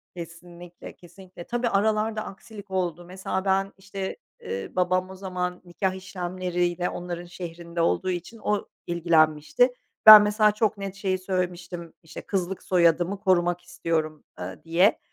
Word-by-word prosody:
Kesinlikle, 175 +1 -10
kesinlikle. 180 0 -13
Tabii, 240 +2 -1
aralarda 215 +1 +1
aksilik 205 0 -11
oldu. 175 -2 -2
Mesela 190 +1 -4
ben, 195 0 +1
işte, 195 0 -6 0.2
eee, 95 0 -5
babam 185 0 +1
o 190 - -9
zaman 180 -1 -4
nikâh 185 +2 -2
işlemleriyle 180 -1 -2
onların 175 0 -6
şehrinde 170 -1 -6
olduğu 185 +2 +1
için 180 +6 -4
o 210 -1 0 0.2
ilgilenmişti. 170 - +3 0.3
Ben, 215 -1 +13
mesela, 210 0 +3
çok 210 -1 0
net 195 -1 -6
şey 190 -2 -1
söylemiştim, 180 -2 -4
işte, 160 - -9
"Kızlık 190 -1 -3
soyadımı 175 +2 +2
korumak 175 -2 +2
istiyorum." 165 -3 -3 0.2
eee, 90 +1 -7
diye. 175 +6 +3
180 Hz, 135 wpm, -25 LUFS, 175-195 Hz, 0.3 s, Ben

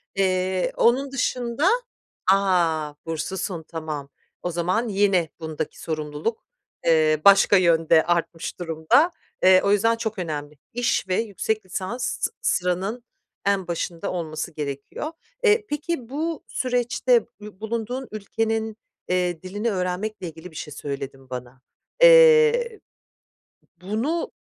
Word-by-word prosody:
Eee, 185 -1 +1
onun 265 +4 +3
dışında 255 +3 0 0.6
A! 170 -6 +2
Burslusun, 165 +2 -3
tamam. 155 -4 -5 0.3
O 175 - -2
zaman 180 +8 0
yine 195 -5 +2
bundaki 160 -1 -5
sorumluluk, 155 +6 -3 0.4
eee, 155 -2 +4
başka 200 0 +7
yönde 165 -2 +4
artmış 170 0 -1
durumda. 165 - +3 0.3
Eee, 185 0 +7
o 200 - +2
yüzden 225 +3 +3
çok 220 -3 -4
önemli. 150 -3 -5 0.2
İş 240 -5 0
ve 185 - +1
yüksek 215 -1 -2
lisans 195 +6 -4 0.2
s - - 0
sıranın 190 +6 0 0.4
en 195 -2 +1
başında 170 0 -3
olması 165 -1 -4
gerekiyor. 145 - -5 0.3
Eee, 430 -1 +4
peki, 295 -5 -3
bu 315 +2 -3
süreçte 245 -1 +1 0.2
ü 210 -2 -11
bulunduğun 235 +4 -3
ülkenin, 220 +1 -2 0.3
eee, 180 -2 0
dilini 205 +5 -2
öğrenmekle 185 +1 -3
ilgili 165 +2 -11
bir - - -18
şey 150 -1 -6
söyledin 135 -2 -6
bana. 125 0 -8 0.4
Eee, 475 -2 +7 1.0
bunu 230 - -2
190 Hz, 120 wpm, -24 LUFS, 165-235 Hz, 1.0 s, başka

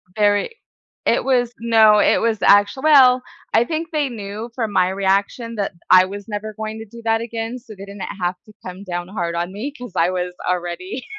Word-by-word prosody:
Very 205 - +1 0.5
it - - +2
was 245 -3 +1
no, 220 -2 +5
it - - +4
was 225 -2 0
actual 205 +5 +4
well, 260 -5 +6 0.3
I 225 - +5
think 325 +5 -4
they 300 -3 0
knew 215 0 -7
from 225 -4 -2
my 185 -2 +2
reaction 200 +4 -1
that 200 -2 -2 0.2
I 185 0 +7
was 200 +1 -8
never 215 0 -5
going 220 0 -5
to 225 - -8
do 235 +3 -13
that 225 0 +2
again, 230 +1 -5
so 230 -2 -13
they 195 -1 -10
didn't 200 -1 -10 0.2
have 180 0 -1
to 215 - -17
come 185 +1 -8
down 175 -2 -4
hard 175 -4 -3
on 175 +2 -2
me 235 +8 -5
'cause 245 -6 -9
I 170 - +3
was 180 -1 -3
already. 180 +6 -3
210 Hz, 205 wpm, -20 LUFS, 190-235 Hz, 0.5 s, I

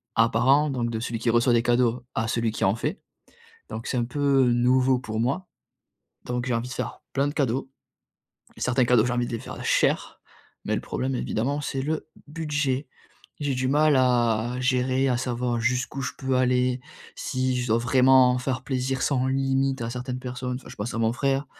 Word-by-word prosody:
à 115 0 +4
parent 135 +6 +3
donc 120 -3 -1
de 110 - -2
celui 115 -1 -3
qui 115 - 0
reçoit 120 +1 +3
des 115 - +4
cadeaux 120 0 +2
à 110 0 0
celui 115 0 0
qui - - -4
en 95 - +3
fait. 150 - -3 0.7
Donc 115 - -6
c'est - - -1
un 120 - +1
peu 135 +1 +2
nouveau 125 +2 +3
pour 110 -3 -5
moi. 140 +10 -1 0.8
Donc 125 0 -2
j'ai 125 - 0
envie 115 +2 -2
de 125 - -6
faire - - -5
plein 140 +1 +2
de 145 - -5
cadeaux 135 -2 -1 0.9
et - - -13
certains 125 0 +2
cadeaux, 120 -2 +4
j'ai 120 - -1
envie 120 0 0
de - - -7
les 115 - -2
faire - - -8
cher - - +1 0.5
mais - - 0
le - - -2
problème 130 +1 -2
évidemment 135 +4 -1
c'est 135 -1 -3
le 155 +3 -2 0.2
budget. 150 -3 -2 0.5
J'ai 145 -2 0
du 130 0 -1
mal 150 +1 +4
à 120 -3 +2
à 125 - -4
gérer, 130 +1 +1
à 125 - +2
savoir 120 -1 -1
jusqu'où 125 +3 -1
je 125 - -3
peux 130 -1 0
aller, 125 0 +2 0.4
si 130 -1 -1
je 120 - -3
dois 110 +1 +3
vraiment 125 +1 +5
faire 130 0 -2
plaisir 130 -1 -1
sans 130 -3 +1
limite 135 0 0
à 115 - -3
certaines 125 +1 -5
personnes 125 0 -4
enfin, 130 - -11
je - - -11
pense 105 +4 -4
à 115 - -2
mon 115 0 +2
frère. 135 +2 0
125 Hz, 205 wpm, -25 LUFS, 120-135 Hz, 0.9 s, vraiment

